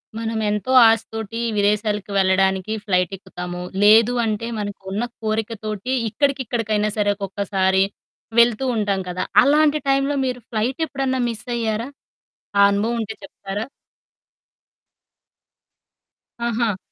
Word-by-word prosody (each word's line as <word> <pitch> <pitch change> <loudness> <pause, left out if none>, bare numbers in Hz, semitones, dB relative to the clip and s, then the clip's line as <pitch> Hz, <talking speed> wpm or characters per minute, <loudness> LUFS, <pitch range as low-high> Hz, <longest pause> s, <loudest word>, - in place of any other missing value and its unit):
మనం 225 0 -3
ఎంతో 210 +5 -2 0.2
ఆశ 225 0 +4
తోటి 225 0 -5 0.2
విదేశాలకు 210 0 0
వెళ్ళడానికి 190 +1 +2
ఫ్లైట్ 180 -4 +1
ఎక్కుతాము. 180 -2 -7 0.2
లేదు 220 +3 +6
అంటే 220 +1 -2
మనకున్న 200 +1 -4 0.2
కోరిక 220 0 -1
తోటి 215 +3 -4 0.2
ఇక్కడికిక్కడికైనా 230 -6 0
సరే 205 -1 +2
ఒక్కొక్కసారి 195 -1 0 0.6
వెళ్తూ 235 +1 +4
ఉంటాం 200 -3 0
కదా! 180 +1 -2 0.2
అలాంటి 300 +1 +4
టైంలో 275 +1 +2
మీరు 250 -1 -2
ఫ్లైట్ 235 +5 -2
ఎప్పుడన్నా 270 -3 -2
మిస్ 230 +1 -7
అయ్యారా? 225 +1 -2 0.7
ఆ - - +6
అనుభవం 215 +4 0
ఉంటే 220 0 -4
చెప్తారా? 195 +2 -6 2.8
ఆహా! 230 -3 0
215 Hz, 110 wpm, -21 LUFS, 200-235 Hz, 2.8 s, లేదు